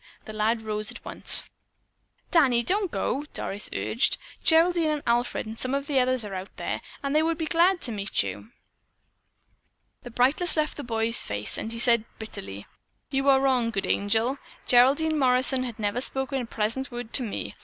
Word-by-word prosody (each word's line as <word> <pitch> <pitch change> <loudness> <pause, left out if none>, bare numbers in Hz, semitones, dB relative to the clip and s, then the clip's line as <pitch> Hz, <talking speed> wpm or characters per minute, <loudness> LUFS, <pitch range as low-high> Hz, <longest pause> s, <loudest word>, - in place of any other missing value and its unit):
The 215 - -8
lad 220 +2 0
rose 215 -1 -3
at - - -7
once. - - +2 0.8
"Danny, 260 -9 +4
don't 390 - +1
go!" 275 - -1
Doris 200 +2 -4
urged. 230 - +1 0.3
"Geraldine 330 0 +4
and 300 -1 -2
Alfred 240 +1 0
and 220 +1 -7
some 255 +1 -1
of 280 0 -2
the 285 -2 +1
others 255 -2 +1
are 200 - -7
out 190 +1 -7
there, - - -3 0.2
and 275 0 -1
they 305 - +5
would 325 0 0
be 320 - -2
glad 350 +3 +3
to 240 - -4
meet 200 - 0
you." 100 +2 -7 1.5
The 245 - -9
brightness 270 +9 +1
left 305 0 0
the 290 - -6
boy's 230 0 0
face, 105 0 -2
and 220 - -3
he 230 - -4
said 235 -2 +4
bitterly, 100 - -8 0.5
"You 270 0 +1
are 270 -1 +6
wrong, 260 -4 +2
Good 195 -4 -2
Angel. 225 +6 0 0.3
Geraldine 285 +6 +4
Morrison 255 0 +3
has 235 -3 -6
never 210 +2 -1
spoken 265 0 -2
a - - -4
pleasant 230 +5 -2
word 240 -2 -7
to - - +3
me. 225 -5 -4
245 Hz, 185 wpm, -26 LUFS, 220-280 Hz, 1.5 s, are